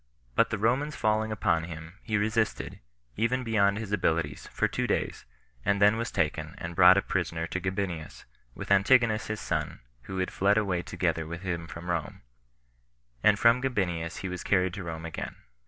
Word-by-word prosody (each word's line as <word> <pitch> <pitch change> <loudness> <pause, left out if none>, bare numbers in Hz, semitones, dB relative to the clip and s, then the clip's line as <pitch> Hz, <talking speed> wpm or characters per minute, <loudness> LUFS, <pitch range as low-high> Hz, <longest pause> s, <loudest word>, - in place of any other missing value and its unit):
But - - +3
the 110 - -1
Romans 130 +8 +1
falling 110 0 +1
upon 85 -6 +1
him, 80 +2 -9
he 110 -3 -1
resisted, 110 +1 -1 0.4
even 120 +4 +1
beyond 100 -3 +2
his 110 -2 -5
abilities, 85 -5 0
for - - 0
two - - -2
days, - - -2 0.4
and 100 0 +2
then 105 +2 +6
was 115 +2 -2
taken, 75 -3 -1
and 85 0 -6
brought 90 +1 +8
a 100 - +2
prisoner 85 -3 -1
to 95 - -3
Gabinius, 95 -4 -4 0.3
with - - -7
Antigonus 110 +2 +4
his 110 0 -3
son, - - -2 0.3
who 95 - -5
had 95 0 -1
fled 100 +2 +3
away 95 -5 +1
together 80 -2 -1
with 85 +3 -7
him 85 -3 -3
from 85 0 -8
Rome; 85 -3 -3 1.0
and 105 -1 +5
from 115 +3 +5
Gabinius 90 -10 -1
he 95 - -3
was 90 -1 -5
carried 90 -2 +2
to 100 0 -5
Rome 80 -1 -6
again. 85 - -5
95 Hz, 180 wpm, -28 LUFS, 85-110 Hz, 1.0 s, brought